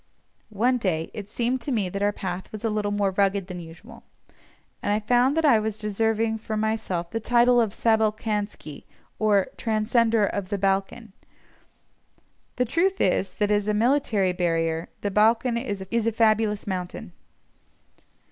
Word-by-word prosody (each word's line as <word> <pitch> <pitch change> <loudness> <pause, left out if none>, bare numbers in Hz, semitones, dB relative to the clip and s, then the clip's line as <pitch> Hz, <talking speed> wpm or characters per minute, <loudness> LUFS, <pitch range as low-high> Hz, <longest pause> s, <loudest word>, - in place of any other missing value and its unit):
One 240 +4 +1
day 165 -6 -1
it 205 -1 -7
seemed 245 +3 -1
to 275 - -4
me 215 -6 0
that 200 +2 -5
our 205 0 +2
path 185 -1 -6
was 215 0 -8
a 225 - 0
little 210 -1 -1
more 205 -1 0
rugged 195 0 +1
than 180 -1 -7
usual, 175 +8 -12 0.8
and 205 - -1
I 210 - +2
found 245 +6 +2
that 325 - +2
I 245 -7 +5
was 215 0 -3
deserving 220 +1 0
for 215 0 -4
myself 215 -6 -2
the 225 - -2
title 240 +2 +4
of 220 -3 0
Sabalkansky, 215 -7 -1 0.3
or 205 -3 +2
"Transcender 225 -1 +2
of 195 -2 -4
the 205 - -1
Balcan." 195 +2 -1 1.4
The 250 - +1
truth 360 - +1
is, 190 +1 +1
that, 210 0 0
as 205 0 +1
a 210 - +1
military 220 -5 +2
barrier, 165 -2 -1
the 205 - -2
Balcan 225 +4 +3
is 235 -5 -3
a 230 +4 -1
fabulous 215 -2 +1
mountain. 180 -2 -5
215 Hz, 155 wpm, -25 LUFS, 195-230 Hz, 1.4 s, I